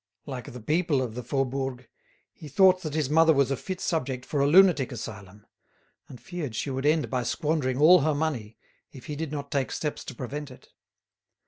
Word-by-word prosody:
Like 130 -4 -7
the 125 - -9
people 155 +4 +1
of 125 -4 -3
the 125 - -5
Faubourg, 130 0 -3 0.5
he 155 - -11
thought 185 +5 +4
that 155 -3 -5
his 155 -4 0
mother 160 +2 +5
was 140 -1 +2
a - - +1
fit 185 +6 -6
subject 130 -6 -2
for 145 - -2
a 140 - +3
lunatic 170 -4 +5
asylum, 105 -4 -9 0.6
and 125 - -12
feared 145 -2 -6
she 140 - -3
would 135 +2 -1
end 155 0 +2
by 130 -1 0
squandering 145 0 -1
all 165 +6 +7
her 155 0 +1
money, 130 -8 -3 0.3
if 130 - -12
he 150 - -5
did 155 0 -4
not 140 -2 -5
take 140 -3 -1
steps 150 -2 -3
to 130 - -8
prevent 140 +4 -6
it. 130 - -16
140 Hz, 200 wpm, -27 LUFS, 125-155 Hz, 0.6 s, all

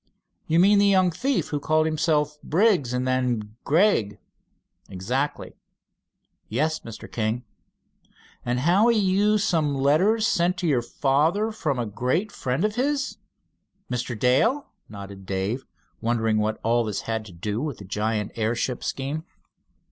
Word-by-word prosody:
"You 165 +1 +3
mean 200 +3 +6
the 200 - +4
young 185 -2 +4
thief 265 - -1
who 145 - -2
called 155 +2 +2
himself 150 -1 0
Briggs, 180 - +2
and 125 +1 -1
then 120 -5 -1
Gregg?" 155 - +2 0.7
"Exactly." 125 +10 -3 1.0
"Yes, 155 +8 0
Mr. 115 - -10
King." 115 +2 -1 1.0
"And 125 +1 -1
how 180 - +4
he 235 -1 +4
used 205 +1 +2
some 155 -5 +1
letters 175 +12 +3
sent 175 -2 +1
to 180 -2 -1
your 135 -6 +2
father 155 - +1
from 150 -10 -2
a 120 - -1
great 130 - -1
friend 130 +4 -1
of 215 - 0
his?" 275 +4 -1 0.7
"Mr. 120 -1 -3
Dale?" 225 - +2 0.2
nodded 100 -2 -10
Dave, 100 +7 -2 0.4
wondering 115 -2 +1
what 110 +1 -1
all 120 +1 +2
this 105 -3 -3
had 110 -1 -3
to 105 - -11
do 105 +6 -3
with 145 -6 -3
the 100 - -10
giant 105 +1 -2
airship 115 +2 -1
scheme. 140 +4 -3
140 Hz, 145 wpm, -24 LUFS, 115-180 Hz, 1.0 s, mean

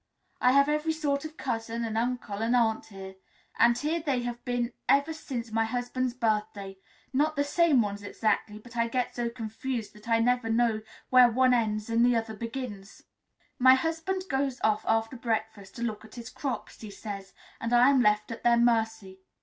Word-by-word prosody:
I 250 0 +5
have 280 +1 +5
every 300 +2 0
sort 290 -2 -1
of 315 0 -8
cousin 230 -2 -3
and 220 -1 -4
uncle 235 -3 -2
and 230 +3 +1
aunt 225 -2 +1
here, 190 -2 -10 0.4
and 235 0 +5
here 315 +3 -1
they 265 -6 0
have 240 0 -5
been 245 -1 -1 0.2
ever 280 +3 +3
since 245 -7 -6
my 225 0 +1
husband's 245 +1 -2
birthday 210 -4 -2 0.3
not 300 +3 +1
the 285 - +1
same 290 -4 +3
ones 205 -1 -4
exactly, 210 0 -1
but 240 +3 -14
I 230 0 +1
get 250 +1 -2
so 240 -1 -1
confused 230 -1 -5
that 210 +2 -13
I 230 - +4
never 245 0 +1
know 225 -1 +2 0.3
where 250 -1 +7
one 255 +2 +3
ends 215 -3 0
and 230 +1 +2
the 245 0 +4
other 225 -1 -2
begins. 230 -3 -7 0.6
My 260 +1 +8
husband 325 +6 -2
goes 270 -3 -1
off 215 -1 +2
after 225 +2 +1
breakfast 220 -4 -3
to 235 - -5
look 220 -3 -3
at 220 +2 -14
his 240 0 -8
crops, 270 -1 -5
he 215 - -8
says, 195 -1 -8 0.3
and 230 - -3
I 245 +3 +6
am 270 -2 +4
left 210 0 +2
at 230 - -6
their 235 0 +4
mercy. 225 -5 +1
235 Hz, 190 wpm, -28 LUFS, 220-255 Hz, 0.6 s, My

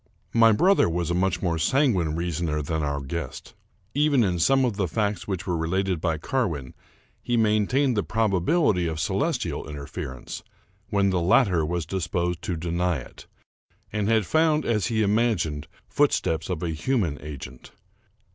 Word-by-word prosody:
My 115 -1 +6
brother 180 - +4
was 85 0 -1
a - - +1
much 90 0 0
more 85 -3 0
sanguine 95 - +2
reasoner 85 -2 -2
than 80 +2 -2
our 70 -1 -2
guest. 70 -1 -6 0.4
Even 145 -3 +3
in 90 -4 0
some 135 +9 +4
of 120 -5 -1
the 100 -2 0
facts 100 0 -2
which 95 -3 -3
were 90 - -1
related 90 +1 -1
by 80 -3 0
Carwin, 80 - -2 0.5
he 120 -1 0
maintained 115 +5 +2
the 105 - +2
probability 105 - +1
of 80 -1 -3
celestial 95 - -1
interfer 70 -1 -6
ence, - - -8 0.5
when 100 -3 +2
the 90 -2 +1
latter 90 -2 +3
was 85 +1 -2
disposed 90 0 -2
to 90 - -3
deny 85 +1 0
it, 60 - -12 0.7
and 105 -1 0
had 110 -3 +3
found, 155 - +2
as 105 -5 +1
he 110 -2 +1
imagined, 100 -9 0 0.2
footsteps 80 +1 +1
of 90 -2 -3
a 85 - -1
human 85 - -1
agent. 65 -4 -9
90 Hz, 160 wpm, -25 LUFS, 80-110 Hz, 0.7 s, My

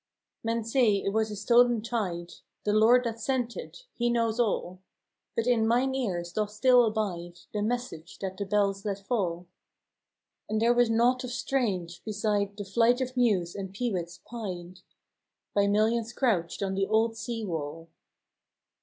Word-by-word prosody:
" - - -59
Men 230 0 -1
say 230 -2 +3
it 195 0 -1
was 220 0 +1
a 210 - -5
stolen 235 +2 +4
tyde 185 -7 -3 0.2
— - - -56
The 210 - +2
Lord 230 +4 +5
that 230 -1 -3
sent 245 0 -1
it, - - -9
He 240 0 0
knows 230 -1 +1
all; 185 -5 0 0.6
But 230 - 0
in 235 -3 +3
myne 250 +3 +2
ears 180 -10 -2
doth 215 -1 -1
still 245 +3 +5
abide 180 -6 -3
The 210 - -1
message 220 -7 -3
that 190 -1 -4
the 200 - -4
bells 200 -1 +1
let 200 -2 -2
fall: 180 -7 -1 1.0
And 215 - 0
there 235 +2 +4
was 240 -1 +3
nought 240 +3 +3
of 250 - -4
strange, 205 -9 -2
beside 210 -2 -1
The 205 - -5
flight 235 +5 +3
of 255 0 -3
mews 205 -9 +2
and 195 -1 -6
peewits 185 -7 -2
pied 185 -6 -6 0.7
By 200 0 +3
millions 220 +3 +1
crouched 200 -8 0
on 195 -1 -1
the 195 0 0
old 225 +1 +2
sea 225 0 -4
wall. 165 -2 -5
215 Hz, 170 wpm, -28 LUFS, 195-235 Hz, 1.0 s, Lord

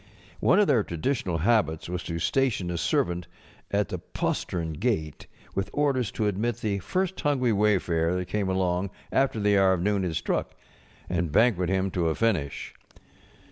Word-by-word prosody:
One 185 - +4
of 210 - +5
their 115 - +3
traditional 90 - -1
habits 90 -4 +1
was 90 0 -3
to 85 - -3
station 105 -1 0
a 85 - -2
servant 85 +1 0 0.4
at 100 0 0
the 90 - -4
postern 80 -1 -3
gate 80 -5 -2 0.3
with 95 0 -2
orders 135 -6 +1
to 110 - -1
admit 105 +4 0
the 100 -2 -1
first 185 - -2
hungry 130 -6 +2
wayfarer 90 -5 +2
that 90 0 -2
came 100 +1 -1
along 95 0 0 0.2
after 135 -4 +2
the 100 -1 +3
hour 95 -1 +5
of 90 -2 -1
noon 100 0 +1
had 90 -3 -2
struck, - - -2 0.5
and 85 -3 -1
banquet 95 -2 +3
him 95 0 0
to 85 -3 +1
a 80 - -1
finish. 90 -12 -1
95 Hz, 170 wpm, -27 LUFS, 85-115 Hz, 0.5 s, of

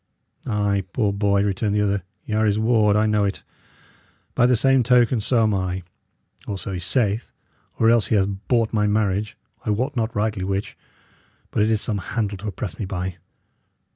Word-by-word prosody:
"Ay, 100 -2 0
poor 105 -5 +1
boy," 100 -1 +2
returned 100 +1 0
the 105 - +2
other, 100 -1 +1 0.2
"y' 110 - -4
are 110 0 +2
his 105 0 +2
ward, 110 -2 +3
I 105 +1 +3
know 105 -1 +2
it. 100 0 -2 0.9
By 120 -1 +4
the 125 - +4
same 135 +3 +4
token, 125 -1 +3
so 115 +1 +2
am 110 -1 +2
I, 95 -1 -2 0.6
or 100 - -3
so 95 +1 -5
he 90 - -3
saith; 105 +3 0 0.5
or 115 - +3
else 115 -3 +3
he - - +1
hath 100 0 -1
bought 115 -3 +1
my 105 -1 +2
marriage 105 -1 0 0.3
I - - -3
wot 125 +7 -1
not 115 -1 -1
rightly 105 -2 -1
which; 95 +1 -3 0.8
but - - 0
it 105 - +3
is 110 -1 +1
some 105 -3 -2
handle 100 -1 -3
to 105 - -6
oppress 100 0 -5
me 105 - -2
by." 90 -1 -4
105 Hz, 195 wpm, -22 LUFS, 100-110 Hz, 0.9 s, By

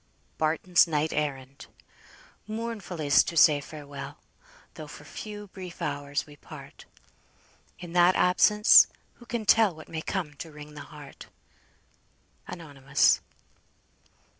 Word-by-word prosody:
BARTON'S 165 +3 +3
NIGHT 155 -1 -1
ERRAND. 140 -2 -4 0.8
"Mournful 215 -5 -6
is't 145 -3 +4
to 170 - -4
say 150 -2 +6
Farewell, 140 -1 -9 0.6
Though 155 - -9
for 150 - -12
few 210 +7 -8
brief 185 -2 -10
hours 145 -1 -3
we 145 -1 -16
part; - - -13 0.9
In 175 -2 -10
that 175 +1 +5
absence, 210 +4 +6 0.3
who 240 - -16
can 235 -3 -4
tell 210 -4 +4
What 155 - -13
may 160 -1 -4
come 170 -4 -4
to 165 - -8
wring 150 0 -12
the 150 - -9
heart!" 145 -3 -12 1.2
ANONYMOUS. 140 -5 +1
155 Hz, 120 wpm, -27 LUFS, 145-185 Hz, 1.2 s, say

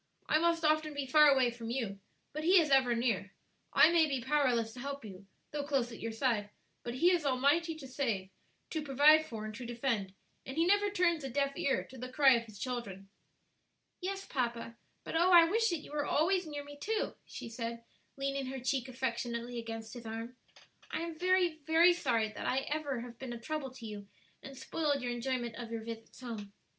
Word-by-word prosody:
I 310 - +3
must 335 0 +2
often 310 -1 +2
be 285 -1 -2
far 300 +3 +6
away 265 -4 +4
from 230 -1 -7
you, 230 -6 -3 0.3
but 305 +1 -4
He 365 +3 +6
is 305 -4 +1
ever 260 -3 +4
near; 225 -4 -1 0.4
I 320 - +6
may 330 -2 +5
be 275 -3 -1
powerless 245 -4 +1
to 250 - -10
help 280 0 -5
you, 195 -1 -11 0.2
though 295 - -2
close 270 -4 0
at 230 - -9
your 230 - -3
side, 225 -3 0 0.3
but 240 0 -5
He 345 +8 +4
is 350 -3 +2
almighty 285 +5 +2
to 290 -4 -9
save, 230 -8 -2 0.4
to 315 - -1
provide 300 +2 +5
for, 220 -2 -6
and 215 - -6
to 240 +4 -7
defend; 235 -5 -2 0.3
and 265 +3 -7
He 330 - +4
never 405 +2 +3
turns 350 -5 +1
a 270 - -4
deaf 275 +2 0
ear 275 - 0
to 260 - -13
the 255 +1 -6
cry 270 -1 +6
of 235 -1 0
His 215 -2 -12
children." 200 -6 -5 0.9
"Yes, 390 +1 -4
papa; 235 -3 -3 0.3
but - - -6
oh 350 +3 +4
I 345 -2 +10
wish 450 +7 +2
that 340 -4 -2
you - - -12
were 295 -1 -1
always 360 +3 +2
near 290 -1 -5
me 290 0 -12
too," 440 +6 -1
she - - -7
said, 230 0 -5 0.3
leaning 275 -1 -2
her 265 +1 -5
cheek 260 0 -1
affectionately 240 -1 -3
against 225 -1 -6
his 235 -2 -8
arm. 225 +3 -6 0.5
"I - - -3
am 335 -1 -5
very, 360 -3 +2
very 335 +2 +6
sorry 235 -10 0
that 260 +5 -2
ever 290 -4 -2
I - - -4
have 240 -1 -11
been 260 -2 -5
a 235 - -7
trouble 305 +1 -4
to 255 -2 -11
you 205 -2 -7 0.3
and 270 0 -10
spoiled 285 0 -1
your 245 - -1
enjoyment 240 -1 -2
of 235 -2 -7
your 225 -1 -4
visits 225 +2 -9
home." 215 -5 -7
265 Hz, 210 wpm, -33 LUFS, 235-310 Hz, 0.9 s, I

